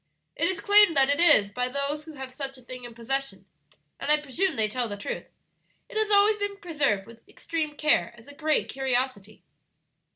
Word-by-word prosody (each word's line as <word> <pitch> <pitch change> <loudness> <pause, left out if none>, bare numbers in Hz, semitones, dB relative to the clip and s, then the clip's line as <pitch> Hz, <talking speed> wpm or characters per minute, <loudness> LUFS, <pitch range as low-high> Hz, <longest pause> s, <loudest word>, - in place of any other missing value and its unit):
"It 335 - 0
is 375 - -2
claimed 410 -6 +5
that 270 +1 +5
it 285 - 0
is 295 -12 +6
by 250 +4 -2
those 280 +3 -3
who 320 - -10
have 265 -2 -9
such 275 -1 -6
a 255 - -16
thing 250 0 -10
in 235 -1 -11
possession, 270 +4 -4 0.5
and 285 - -2
I 300 - +4
presume 310 +7 -2
they 220 -1 +1
tell 240 +2 -2
the 205 - -6
truth. 200 - -5 0.6
It - - -14
has 435 -1 0
always 415 +1 +4
been 410 -1 -4
preserved 290 - -1
with 230 +1 -15
extreme 310 -3 -4
care 305 +1 +2
as 230 - -17
a 285 - -12
great 310 +1 0
curiosity. 255 -5 -2
280 Hz, 200 wpm, -26 LUFS, 250-325 Hz, 0.6 s, is